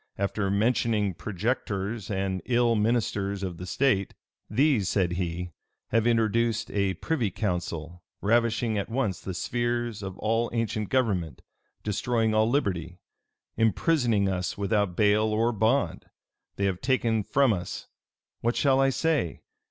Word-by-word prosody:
After 100 0 -1
mentioning 105 -1 +1
projectors 105 +2 -3
and 95 -2 -1
ill 120 -2 +3
ministers 105 -3 0
of 90 -1 -5
state, 125 -8 +1 0.3
"These," 120 - +2
said 90 -4 +1
he, 90 0 -3 0.4
"have 115 +1 +2
introduced 115 0 +1
a 100 -2 0
privy 120 - -1
council, 90 -4 -3 0.2
ravishing 115 0 +1
at 100 - -4
once 115 -8 -1
the 95 - -5
spheres 120 -1 -2
of 95 -1 -6
all 115 +2 0
ancient 110 -3 -1
government; 100 - 0 0.4
destroying 110 +1 0
all 110 +1 +3
liberty; 90 - -1 0.6
imprisoning 115 - +2
us 90 -1 -2
without 100 -2 0
bail 105 0 +4
or 110 +2 +1
bond. 115 +5 0 0.5
They 100 - -1
have 95 -2 -1
taken 120 -4 +1
from 135 +3 +3
us 90 -3 -5 0.5
What 120 +1 0
shall 135 -2 +3
I 135 - +4
say? 150 - 0
110 Hz, 130 wpm, -27 LUFS, 95-120 Hz, 0.6 s, bail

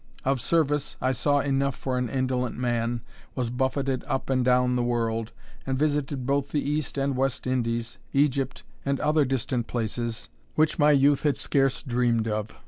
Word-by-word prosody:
Of 135 -2 +1
service, 150 -1 +1
I 130 - +1
saw 145 +3 +2
enough 140 -1 0
for 130 -1 -2
an 125 -2 -1
indolent 130 0 -1
man 120 -1 -1 0.3
was 125 -3 -1
buffeted 130 0 -1
up 135 0 -2
and 130 -1 +2
down 125 0 +3
the 125 - +1
world, 115 -2 -1 0.3
and 135 -1 -1
visited 145 -2 0
both 140 +1 0
the 145 -2 -1
East 150 0 -2
and 135 0 0
West 135 0 -1
Indies, 120 -2 -1
Egypt, 135 -1 +1 0.2
and 140 0 0
other 150 0 +3
distant 125 -2 -1
places, 115 0 -3 0.3
which 155 0 +2
my 150 0 +6
youth 140 -1 +4
had 145 -2 +1
scarce 135 -2 +1
dreamed 120 -3 +1
of. 105 0 -2
130 Hz, 170 wpm, -26 LUFS, 120-140 Hz, 0.3 s, my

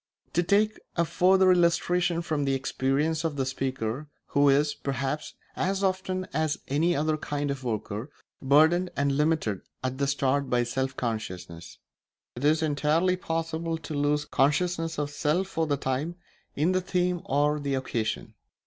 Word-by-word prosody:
To 175 - +3
take 210 +4 +2 0.2
a 170 - +2
further 185 +2 +4
illustration 175 0 +2
from 150 -3 -1
the 135 0 +1
experience 135 +4 0
of 160 -3 -1
the 135 -2 0
speaker, 130 0 -3 0.2
who 145 0 +4
is, 145 +2 +3
perhaps, 135 +2 -3 0.2
as 195 +2 -1
often 185 -1 -1
as 155 +1 0
any 165 +5 +2
other 155 +1 +1
kind 145 -1 -2
of 135 -1 -5
worker, 110 +1 -3 0.3
burdened 160 +6 +4
and 140 0 +2
limited 150 - +1 0.2
at 130 +1 -2
the 140 - +1
start 140 0 +1
by 120 -1 +2
self 130 +2 -2
consciousness: 95 -8 -5 0.6
it 125 - -7
is 155 +2 +3
entirely 155 +4 +2
possible 165 -1 -2
to 160 0 -7
lose 145 +1 +1
consciousness 165 +4 +1
of 145 0 -2
self 150 +5 0
for 165 -4 -2
the 145 -1 +1
time 135 +6 -2 0.4
in 155 +5 +2
the 185 0 +1
theme 180 -1 0
or 145 +2 +2
the 140 -1 -1
occasion. 120 -4 -3
150 Hz, 155 wpm, -27 LUFS, 135-170 Hz, 0.6 s, further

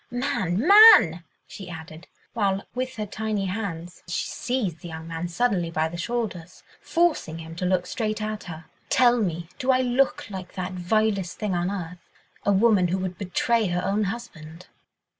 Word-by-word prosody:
Man, 240 - -1
man," 395 - +8 0.2
she 190 -3 -10
added, 160 0 -10 0.3
while, 200 -3 0
with 255 +1 -3
her 215 -1 -3
tiny 210 -1 -3
hands 180 -3 -5
she 175 - -2
seized 225 -10 -2
the 175 - -9
young 160 0 -8
man 165 +1 -4
suddenly 180 -2 0
by 160 -1 0
the 170 - -8
shoulders, 185 -3 -4 0.2
forcing 330 - 0
him 165 0 -9
to 180 - -1
look 180 -1 +1
straight 215 0 -3
at 215 0 -4
her, 160 -2 -8 0.2
"tell 245 -2 +4
me, 170 -5 -2
do 260 - -3
I 255 -1 +4
look 255 +2 +1
like 190 -2 -7
that 185 0 -4
vilest 195 0 0
thing 210 -3 -2
on 175 +1 0
earth—a 180 +1 -6
woman 200 -2 +4
who 180 +2 -1
would 185 -1 -4
betray 215 +3 +1
her 180 0 -1
own 205 +2 +1
husband?" 180 -6 -7
190 Hz, 170 wpm, -25 LUFS, 175-225 Hz, 0.3 s, man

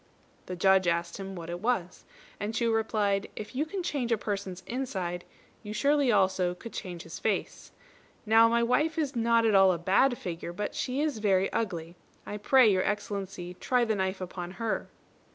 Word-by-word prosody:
The 180 - -4
Judge 190 0 +4
asked 170 0 0
him 195 -1 -6
what 170 -1 -6
it 175 - -4
was; 200 -5 -2 0.3
and 210 +2 -3
Chu 230 0 +1
replied, 210 -3 0
"If 215 +3 -8
you 300 +4 0
can 370 +3 -4
change 275 -8 -2
a 230 - +3
person's 195 -3 -4
inside, 190 -9 -3 0.4
you 210 -1 -7
surely 285 +5 +2
could 240 - +4
also 190 -2 +2
change 180 -4 -7
his 165 - -8
face. 215 -3 -2 0.5
Now 225 +1 +6
my 235 0 +2
wife 300 +7 +1
is 290 -4 -1
not 230 0 +3
at 220 - +3
all 195 -1 +6
a 175 - 0
bad 205 +9 +3
figure, 170 -1 -5
but 205 +3 -4
she 260 +3 -2
is 300 -7 -1
very 195 -2 +2
ugly. 170 -6 -3 0.3
I 205 - -5
pray 255 +3 +5
Your 190 -3 +3
Excellency 195 -3 -3
try 245 +6 +1
the 220 - +1
knife 190 -1 -1
upon 180 0 -6
her." 230 -2 -2
205 Hz, 190 wpm, -29 LUFS, 185-235 Hz, 0.5 s, Now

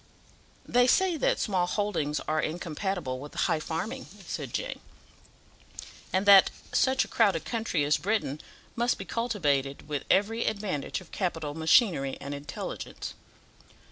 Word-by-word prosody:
"They 245 0 +4
say 375 +5 +3
that - - +2
small 185 -4 +1
holdings 175 -8 -1
are 155 0 0
incompatible 170 -3 -3
with 145 +2 -10
high 155 - +1
farming," 205 +13 -4 0.2
said - - -5
Jane, - - -3 1.3
"and 190 +2 +1
that 200 -1 +8 0.2
such 265 0 +3
a - - -13
crowded 200 -8 +2
country 225 -10 -1
as 145 +1 +3
Britain 195 -8 -1 0.3
must 240 +1 +1
be - - -7
cultivated 145 - -1
with 145 -2 -3
every 225 +4 +2
advantage 200 -8 -2
of 185 - -16
capital, 160 -6 -2
machinery, 160 - +3
and 140 +1 -6
intelligence." 145 0 -6
185 Hz, 135 wpm, -28 LUFS, 150-220 Hz, 1.3 s, that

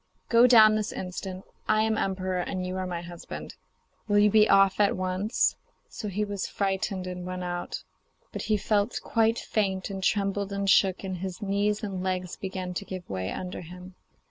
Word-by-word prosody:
Go 235 +1 +7
down 220 -3 +8
this 215 -1 -1
instant; 185 +1 -6 0.2
I 215 0 +3
am 220 0 +1
emperor 185 -2 -1
and 185 +1 -3
you 185 0 -3
are 185 0 -2
my 175 -1 -4
husband. 170 0 -8 0.5
Will 205 -1 +3
you 205 0 +5
be 215 0 +5
off 195 0 +5
at 205 -2 +3
once?' 185 +3 +1 0.3
So 215 - -6
he 205 +2 -1
was 200 -1 -3
frightened 195 -1 -1
and 180 0 -5
went 180 0 -4
out; 175 0 -4 0.5
but - - -5
he 215 - +4
felt 205 +2 0
quite 225 0 +2
faint, 195 -4 -1
and 195 -1 -5
trembled 200 0 0
and 200 0 -2
shook, 190 -1 +4
and 190 -1 -3
his 190 +3 -5
knees 205 +2 0
and 195 -3 -3
legs 185 -1 -2
began 185 -1 -5
to 180 - -3
give 185 -2 -7
way 95 0 -2
under 180 -1 -5
him. 180 +2 -11
195 Hz, 190 wpm, -27 LUFS, 185-205 Hz, 0.5 s, down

